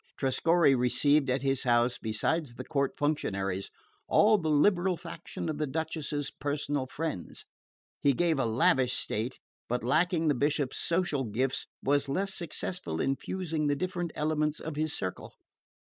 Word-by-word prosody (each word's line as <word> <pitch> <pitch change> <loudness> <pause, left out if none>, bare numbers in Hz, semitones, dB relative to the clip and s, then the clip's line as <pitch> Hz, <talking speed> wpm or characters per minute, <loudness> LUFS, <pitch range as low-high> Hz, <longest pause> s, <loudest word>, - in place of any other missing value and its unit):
Trescorre 160 +3 +3
received 135 +3 +3
at 130 +1 0
his 135 -1 +1
house, 120 0 +2
besides 120 +5 -1
the 130 - -6
court 140 -1 0
functionaries, 100 -10 -1 0.4
all 215 0 +5
the 160 -3 -1
liberal 175 +4 +3
faction 170 0 -7
and 155 -2 -3
the 150 - 0
Duchess's 150 -1 -2
personal 145 -1 -2
friends. 150 - -5 0.6
He 140 - +4
kept 165 0 +1
a 135 - +2
lavish 125 +2 +3
state, 115 +5 -1 0.3
but 125 0 -1
lacking 165 +5 +2
the 150 - +4
Bishop's 140 0 0
social 170 -5 0
gifts, 125 +5 -1 0.2
was 140 0 +2
less 195 +7 0
successful 170 - -3
in 135 - +1
fusing 165 -2 -2
the 145 - +2
different 175 +2 -2
elements 150 0 0
of 160 -2 -6
his 155 +1 0
circle. 95 -9 -4
145 Hz, 150 wpm, -29 LUFS, 130-160 Hz, 0.6 s, all